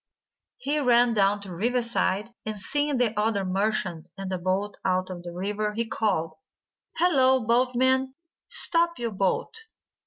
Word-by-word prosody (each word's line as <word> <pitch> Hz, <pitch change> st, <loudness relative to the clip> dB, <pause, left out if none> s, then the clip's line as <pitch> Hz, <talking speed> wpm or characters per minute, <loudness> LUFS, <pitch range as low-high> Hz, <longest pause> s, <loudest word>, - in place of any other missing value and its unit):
He 300 Hz, -11 st, -1 dB
ran 245 Hz, -3 st, +4 dB
down 205 Hz, -1 st, +2 dB
to 200 Hz, -, -9 dB
the 175 Hz, -, -7 dB
riverside, 230 Hz, 0 st, 0 dB
and, 215 Hz, -1 st, -4 dB
seeing 290 Hz, +7 st, +1 dB
the 240 Hz, -3 st, +1 dB
other 210 Hz, -2 st, 0 dB
merchant 190 Hz, -3 st, -1 dB
in 195 Hz, -1 st, -5 dB
the 185 Hz, -1 st, -2 dB
boat 190 Hz, +3 st, -2 dB
out 185 Hz, 0 st, 0 dB
in 175 Hz, -1 st, -7 dB
the 175 Hz, 0 st, -8 dB
river, 205 Hz, +4 st, -2 dB
he 230 Hz, +1 st, -1 dB
called: 165 Hz, -8 st, -2 dB, 0.5 s
"Hallo, 265 Hz, -8 st, +3 dB
Boatman! 260 Hz, +2 st, +2 dB, 0.3 s
Stop 340 Hz, 0 st, +2 dB
your 235 Hz, -2 st, -3 dB
boat!" 195 Hz, -, -1 dB
215 Hz, 150 wpm, -26 LUFS, 190-250 Hz, 0.5 s, ran